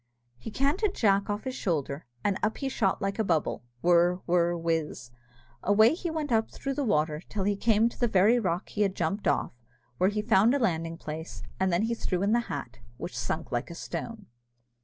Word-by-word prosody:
He 125 - -7
canted 295 - 0
Jack 200 -2 +2
off 205 +1 -2
his 260 - -3
shoulder, 150 - -2 0.2
and 200 -2 +1
up 220 - 0
he 275 - -2
shot 200 -8 0
like 195 +2 -2
a - - +3
bubble 165 -6 0 0.2
whirr, 175 0 +5
whirr, 175 0 +2
whiz 165 -7 -2 0.5
away 215 +6 +5
he 345 +1 -3
went 315 -4 -3
up 225 -1 +2
through 275 - -4
the 285 - -1
water, 155 - +1
till 200 -3 -2
he 205 +1 +1
came 220 +2 +3
to 235 - -7
the 240 - +3
very 215 +4 +4
rock 180 -5 -2
he 210 - -3
had 195 -2 +2
jumped 200 -1 -1
off, 145 - +1 0.5
where 185 - +4
he 210 0 -2
found 220 +3 +4
a - - +3
landing 165 -7 -1
place, 160 +1 -7 0.2
and 190 0 +2
then 175 +2 +2
in - - +1
he - - +1
threw 195 -5 -2
the 220 +4 +3
hat, - - -5 0.2
which - - -6
sunk - - -3
like 120 - -2
a 170 - -8
stone. 220 +4 -6
200 Hz, 210 wpm, -28 LUFS, 170-230 Hz, 0.5 s, whirr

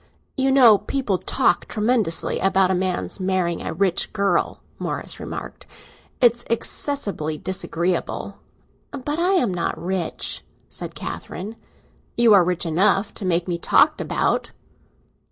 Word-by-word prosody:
"You 270 0 +2
know 240 -6 +7
people 210 -3 -1
talk 175 - +1
tremendously 215 -5 +1
about 190 -1 +3
a - - +2
man's 185 +1 -1
marrying 185 -3 0
a - - -4
rich 190 -3 0
girl," 200 -4 0 0.2
Morris - - -4
remarked. - - -7 0.5
"It's 240 -1 +4
excessively 210 - -2
disagreeable." 175 0 -3 0.5
"But 290 +3 -4
I 360 +3 +2
am 245 - +2
not 175 -1 -2
rich?" 180 -1 -2 0.2
said - - -8
Catherine. 205 +6 -6 0.6
"You 235 -2 +6
are 195 -3 +7
rich 180 0 -1
enough 195 +5 +2
to 200 - -6
make 175 -1 +1
me 175 -1 -2
talked - - +3
about!" - - -1
190 Hz, 130 wpm, -22 LUFS, 180-230 Hz, 0.6 s, know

